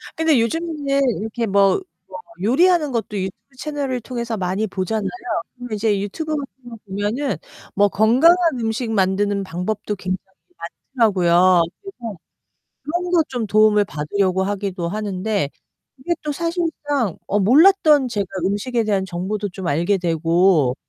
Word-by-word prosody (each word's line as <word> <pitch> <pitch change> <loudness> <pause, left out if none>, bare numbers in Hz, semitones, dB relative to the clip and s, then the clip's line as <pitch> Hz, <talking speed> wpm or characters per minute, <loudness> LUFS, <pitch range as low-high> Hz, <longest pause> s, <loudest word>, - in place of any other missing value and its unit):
근데 320 -6 +3
요즘에 290 +2 -1 0.2
이렇게 225 +2 -3
뭐 200 - +3 0.3
뭐 - - -6 0.2
요리하는 310 - +3
것도 225 -3 -3
유튜브 210 +8 -7
채널을 280 -4 -3
통해서 235 -1 -4
많이 190 +2 -1
보잖아요. 195 +1 -2 0.5
그럼 245 -1 -9
이제 210 -1 +1
유튜브 310 +10 -3
같은 265 -3 -7
거 230 - -8
보면은 205 +8 -2 0.4
뭐 205 0 +5
건강한 245 - +5 0.2
음식 225 +1 -2
만드는 200 0 +1
방법도 195 +4 -3
굉장히 185 -1 -3 0.8
많더라고요. 185 -6 +4 0.2
그래서 240 - -8 0.7
그런 350 +3 -3
거 345 -2 +4
좀 245 -4 -3
도움을 210 0 +4
받으려고 185 +4 -1
하기도 195 -3 -2
하는데 205 -4 -2 0.5
이게 310 +7 -1
또 300 - -2
사실상 295 - -2
어 205 - +1
몰랐던 295 - +5
제가 205 -4 -2 0.2
음식에 225 +4 -1
대한 200 -3 0
정보도 190 +3 -3
좀 185 0 -7
알게 170 +7 +1
되고 165 -4 +2
215 Hz, 315 characters per minute, -21 LUFS, 190-265 Hz, 0.8 s, 뭐